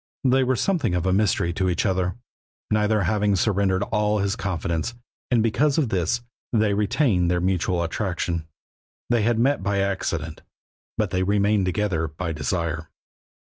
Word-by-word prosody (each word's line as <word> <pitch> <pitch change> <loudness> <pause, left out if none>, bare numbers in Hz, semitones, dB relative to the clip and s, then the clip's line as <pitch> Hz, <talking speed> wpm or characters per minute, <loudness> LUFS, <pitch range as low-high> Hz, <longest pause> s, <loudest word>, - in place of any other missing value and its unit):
They 130 0 +4
were 130 0 +1
something 160 - 0
of 90 0 -1
a 95 - +2
mystery 95 -4 +1
to 95 +1 0
each 90 +3 0
other, 95 -2 0 0.6
neither 105 -1 +2
having 105 +2 +1
surrendered 95 -1 +1
all 105 0 +1
his 100 0 0
confidence, 90 0 -2 0.3
and 120 -3 +3
because 135 +6 +2
of 145 -7 +2
this 95 +5 0 0.3
they 110 -3 +2
retained 100 - +2
their 90 0 +1
mutual 90 -1 0
attraction. 85 -2 -2 0.6
They 120 -2 +3
had 115 +1 +2
met 135 +3 +2
by 100 +1 0
accident, 100 -1 -2 0.6
but - - 0
they 95 - 0
remained 100 0 +2
together 90 -4 0
by 80 +2 -4
desire. 80 0 -2
100 Hz, 155 wpm, -24 LUFS, 90-110 Hz, 0.6 s, They